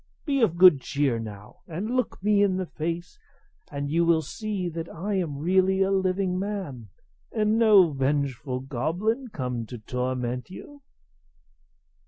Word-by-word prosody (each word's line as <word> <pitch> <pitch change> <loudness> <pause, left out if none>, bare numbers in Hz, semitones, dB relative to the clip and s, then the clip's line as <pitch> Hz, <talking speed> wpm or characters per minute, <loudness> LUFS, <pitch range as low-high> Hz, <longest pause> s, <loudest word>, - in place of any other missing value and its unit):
Be 275 -4 +1
of 180 -7 +2
good 180 -6 +7
cheer, 135 -3 0
now, 105 - -9
and 195 +9 -3
look 250 -6 -2
me 205 -1 +3
in 195 -2 +2
the 185 - -2
face, 170 - -5 0.5
and 140 0 -3
you 165 +4 +2
will 165 -1 +3
see 210 -3 -4
that 165 0 -5
I 195 +6 -4
am 170 -7 -1
really 190 +4 +2
a 190 - 0
living 185 -1 0
man, 185 - -5 0.4
and 215 0 +1
no 205 -7 +6
vengeful 135 -1 -1
goblin 170 - -2
come 125 - -4
to 125 - -7
torment 125 +2 -3
you." 285 +9 -11
170 Hz, 150 wpm, -26 LUFS, 135-200 Hz, 0.5 s, good